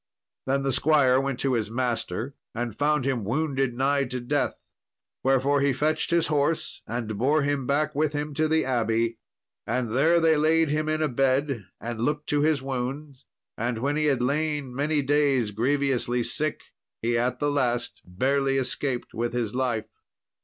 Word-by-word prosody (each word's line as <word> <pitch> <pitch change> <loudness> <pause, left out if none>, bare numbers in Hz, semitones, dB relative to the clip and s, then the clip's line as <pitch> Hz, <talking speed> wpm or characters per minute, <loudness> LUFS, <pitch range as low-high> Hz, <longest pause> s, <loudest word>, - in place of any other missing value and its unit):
Then 135 +1 +1
the 135 - +1
squire 135 -3 +4
went 135 -2 -2
to 135 -2 +1
his 110 -3 0
master, 120 0 -2 0.2
and 120 -2 -3
found 150 -2 +1
him 130 -5 0
wounded 135 +2 -1
nigh 140 +2 +1
to 125 0 -4
death, 145 +4 -2 0.6
wherefore 135 +2 +3
he 140 -1 +2
fetched 155 +4 0
his 170 -1 +3
horse, 150 +1 0
and 110 -3 -4
bore 145 +5 +3
him 140 -2 -1
back 150 +2 +1
with 155 +1 0
him 145 0 -3
to 155 +2 +1
the 160 +1 +2
abbey. 115 -2 0 0.5
And 120 -1 -1
there 160 +7 +4
they 160 -1 +4
laid 160 +1 +3
him 155 +1 0
in 155 0 0
a - - +2
bed, 135 -4 0
and 115 -1 -5
looked 150 +4 -1
to 145 0 +2
his 150 -3 +2
wounds; 135 +2 -5 0.3
and 120 +1 -2
when 140 +5 -1
he 155 0 +1
had 135 -4 +2
lain 145 -1 -1
many 145 +2 0
days 135 -5 +2
grievously 125 +1 0
sick, 155 +4 -1 0.4
he 120 +1 +1
at 120 +2 0
the 145 0 0
last 120 -4 -1
barely 135 +8 0
escaped 130 -1 -1
with 120 +1 -2
his 115 -4 -2
life. 125 -4 -1
135 Hz, 175 wpm, -26 LUFS, 120-150 Hz, 0.6 s, squire